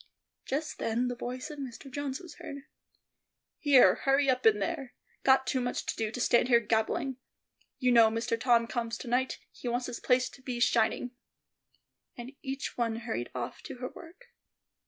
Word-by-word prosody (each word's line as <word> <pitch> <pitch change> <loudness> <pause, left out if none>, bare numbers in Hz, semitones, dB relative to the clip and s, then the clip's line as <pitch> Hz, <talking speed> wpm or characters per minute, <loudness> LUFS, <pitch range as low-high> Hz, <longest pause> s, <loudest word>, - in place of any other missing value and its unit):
Just 305 +3 -3
then 240 +3 0
the 245 - -3
voice 255 +5 -5
of 295 - -8
Mr. 265 0 -7
Jones 275 0 -3
was 350 - -12
heard. 280 -1 -8 1.0
"Here, 265 - +7
hurry 275 0 +2
up 255 -2 +2
in 215 -2 +6
there; 245 +6 -3 0.3
got 265 0 +4
too 260 - 0
much 245 0 -2
to - - -2
do 220 -1 -1
to 235 - -6
stand 240 0 +3
here 235 -2 +6
gabbling. 230 +3 0 0.6
You 255 -2 +2
know 230 -2 +7
Mister 230 +1 -1
Tom 235 0 +3
comes 235 -1 -3
to - - -9
night; 250 +2 0
he - - -8
wants 245 +1 0
this - - -5
place 250 0 +2
to 270 - -16
be 250 -2 -4
shining." 240 +1 +2 1.3
Each 270 0 -4
one 230 -2 +1
hurried 220 - -4
off 125 0 -5
to - - -8
her 250 0 -5
work. 365 +8 -15
250 Hz, 180 wpm, -30 LUFS, 230-270 Hz, 1.3 s, Here